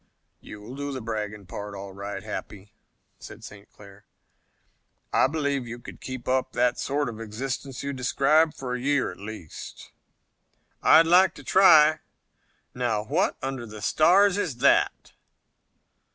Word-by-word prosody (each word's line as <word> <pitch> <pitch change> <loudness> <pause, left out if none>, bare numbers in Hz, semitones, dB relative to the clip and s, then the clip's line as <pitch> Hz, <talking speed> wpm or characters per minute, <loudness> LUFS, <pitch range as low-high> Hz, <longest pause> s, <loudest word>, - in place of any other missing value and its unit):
"You'll 105 +5 -11
do 145 0 -4
the 135 - -4
bragging 105 -3 -5
part, 100 +2 -7
all 100 0 -8
right, 100 +1 -6
Happy," 105 +1 -8 0.5
said - - -12
St. 100 0 -13
Clair. 100 0 -16 1.1
"I - - +4
believe 140 -3 -2
you 120 +1 -7
could 120 - -12
keep 130 -2 -7
up 130 0 0
the 125 0 +2
sort 145 +3 -2
of 115 -1 -7
existence 125 +4 -5
you 140 0 -3
describe 145 +5 +2
for 125 -2 -5
a 125 - -3
year 140 0 +1
at - - -13
least." 100 -5 -9 0.9
"I'd 165 +1 +6
like 180 +3 +5
to - - -12
try. 155 -5 +6 0.7
Now, 115 -4 -1
what 105 - 0
under 130 -3 -4
the 105 0 -10
stars 185 - +4
is 160 -10 -2
that?" 135 +3 +2
125 Hz, 145 wpm, -25 LUFS, 105-145 Hz, 1.1 s, I'd